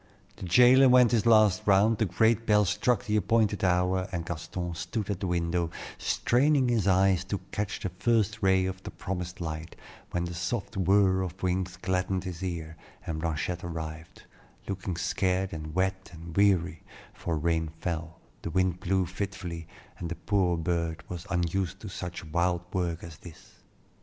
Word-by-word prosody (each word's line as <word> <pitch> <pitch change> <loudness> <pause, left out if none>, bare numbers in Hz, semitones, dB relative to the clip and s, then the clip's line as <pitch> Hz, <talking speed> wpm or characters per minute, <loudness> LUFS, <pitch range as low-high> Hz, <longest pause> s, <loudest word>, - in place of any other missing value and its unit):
The 100 - -6
jailer 125 +8 +7
went 125 -2 +6
his 115 -1 +2
last 110 -4 +5
round, 105 +3 +4
the 110 - +3
great 110 +5 +2
bell 105 -1 +5
struck 110 +6 +1
the 105 -2 +1
appointed 105 -2 +1
hour, 90 +1 +2
and 85 -2 -3
Gaston 85 +1 -4
stood 95 +5 -3
at 95 - -3
the 95 - -2
window, 85 -1 0 0.3
straining 135 +1 +2
his 110 -5 +1
eyes 95 -1 +4
to 100 +1 -2
catch 105 -1 -3
the 95 - -2
first 110 +3 0
ray 95 -1 +3
of 95 0 -4
the - - -7
promised 90 0 -5
light, 80 -1 -5 0.3
when 85 - -1
the 85 - -5
soft 85 +2 -3
whir 95 0 +3
of 95 +1 -6
wings 90 0 -1
gladdened 95 0 -1
his 90 -2 -6
ear, 85 -3 -4 0.3
and 80 -1 -3
Blanchette 85 +2 -2
arrived, 80 -1 -7 0.4
looking 95 -2 -3
scared 95 +1 0
and 80 0 -6
wet 95 0 -1
and 85 -1 -10
weary, 95 -5 +2 0.3
for 85 -2 -3
rain 80 +1 0
fell, 85 -1 -4 0.2
the - - -4
wind 90 +1 +1
blew 95 0 +1
fitfully, 90 -2 -5 0.3
and 85 - -4
the 85 - -3
poor 95 -4 +1
bird 85 0 -2
was 90 -1 -6
unused 90 +2 -1
to 105 - -8
such 90 -2 -6
wild 85 +2 0
work 85 -2 -1
as 80 -3 -9
this. 85 -3 -15
90 Hz, 170 wpm, -28 LUFS, 85-100 Hz, 0.4 s, jailer